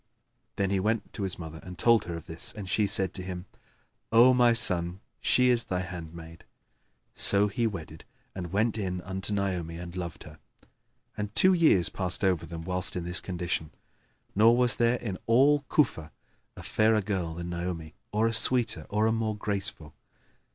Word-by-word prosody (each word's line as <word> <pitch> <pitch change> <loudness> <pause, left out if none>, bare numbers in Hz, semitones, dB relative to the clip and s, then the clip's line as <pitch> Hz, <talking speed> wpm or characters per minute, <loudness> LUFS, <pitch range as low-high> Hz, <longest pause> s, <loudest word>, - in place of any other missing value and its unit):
Then 100 -1 -1
he 100 - +1
went 110 +3 -1
to - - -6
his 95 -1 -2
mother 80 -2 -8
and 90 -1 -10
told 115 +1 +3
her 85 - -5
of 85 - -8
this, 80 0 -3
and 100 -3 -8
she 105 +2 +1
said 95 -3 +2
to 95 - -5
him, 90 -1 -6 0.7
"O 120 +3 +7
my 125 -1 +5
son, 90 -6 +2 0.2
she 125 0 +3
is 120 -1 +2
thy 90 -1 -2
handmaid." 85 -2 -9 0.7
So 100 +1 +3
he 115 +3 -1
wedded 80 -6 -7 0.3
and 90 -3 -6
went 110 +3 +1
in 90 -3 -3
unto 95 +2 -4
Naomi 90 -5 -2
and 85 0 -8
loved 85 -2 -6
her; 75 0 -14 0.8
and 105 0 -4
two[FN#4] 185 -1 +5
years 100 - +4
passed 90 -1 -3
over 95 -4 +1
them 80 0 -7
whilst 90 +1 0
in 90 - -3
this 90 +1 -1
condition, 85 -4 -3 0.6
nor 115 +4 +5
was 125 -4 +3
there 120 +1 +2
in 100 -7 -5
all 140 +5 +4
Cufa 80 - +1 0.5
a - - -9
fairer 110 0 +2
girl 95 -5 -3
than 85 +1 -6
Naomi, 85 -2 -5 0.2
or 110 +2 +1
a 115 - +1
sweeter 115 -7 +2
or 105 +1 +1
a 110 - +3
more 110 -1 -1
graceful. 95 -7 -3
95 Hz, 180 wpm, -28 LUFS, 85-110 Hz, 0.8 s, O